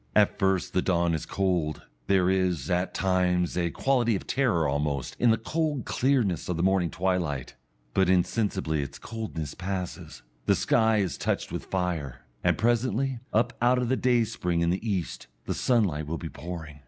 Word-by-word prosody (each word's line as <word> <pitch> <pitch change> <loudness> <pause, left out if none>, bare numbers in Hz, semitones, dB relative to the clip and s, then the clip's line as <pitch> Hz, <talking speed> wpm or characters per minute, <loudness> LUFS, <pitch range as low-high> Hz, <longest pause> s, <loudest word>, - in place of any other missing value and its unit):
At 105 -1 +4
first 95 -1 +1
the 90 - +2
dawn 85 -2 +1
is 80 - -3
cold 90 -6 -1 0.2
there 95 -2 +3
is, 90 -5 +1
at 90 +1 0
times, 90 -2 +1
a 85 -1 +1
quality 120 0 +1
of 95 - -4
terror 120 - +1
almost 70 -2 -1
in 120 - +4
the 110 - +4
cold 150 +2 -2
clearness 120 - +1
of 90 - -1
the 85 - 0
morning 95 -2 +2
twilight; 85 -8 -1 0.4
but 95 -2 +3
insensibly 95 -4 +1
its 70 0 -6
coldness 105 - -5
passes, 90 -9 -5 0.2
the - - +5
sky 110 -1 +3
is 95 -4 -1
touched - - -1
with - - -4
fire, 80 -10 -3 0.2
and - - +2
presently, 120 +2 +1
up 110 +3 +2
out 125 +1 +4
of 125 -1 0
the 130 - +3
dayspring 115 -9 +1
in 85 0 +2
the 95 - -2
east, 95 -6 -3 0.2
the - - -1
sunlight 95 - +1
will 85 +2 -2
be - - -6
pouring.... 80 -3 -8
95 Hz, 175 wpm, -27 LUFS, 85-110 Hz, 0.4 s, the